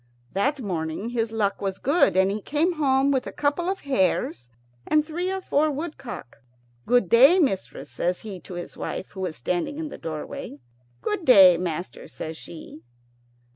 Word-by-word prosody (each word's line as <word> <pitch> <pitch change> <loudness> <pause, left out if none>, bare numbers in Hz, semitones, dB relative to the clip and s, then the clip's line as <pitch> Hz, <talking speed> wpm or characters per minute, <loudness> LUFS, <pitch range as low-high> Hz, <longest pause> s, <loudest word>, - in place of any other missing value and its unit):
That 280 +9 0
morning 170 +2 -3
his 230 -2 -1
luck 210 -3 -1
was 195 -1 -2
good, 285 - +3
and 190 +1 +4
he 210 +1 -3
came 310 - +1
home 275 -3 +2
with 265 -2 0
a - - -5
couple 295 +5 0
of 385 - -3
hares 190 - 0 0.4
and 305 -1 +3
three 345 +4 -3
or 385 0 -3
four 310 -3 +2
woodcock. 280 - -6 0.5
"Good 245 -5 +3
day, 270 - +7
mistress," 265 - -1
says 180 +1 -2
he 200 -4 -7
to 175 +2 -10
his 175 - -7
wife, - - -5
who 195 - -10
was 185 -4 -3
standing 175 - -2
in 315 -1 -4
the - - -9
doorway. 155 -2 -6 0.5
"Good 420 -4 -1
day, 195 - +8
master," 175 0 -4
says 160 0 -7
she. 155 -8 -11
230 Hz, 175 wpm, -25 LUFS, 180-295 Hz, 0.5 s, day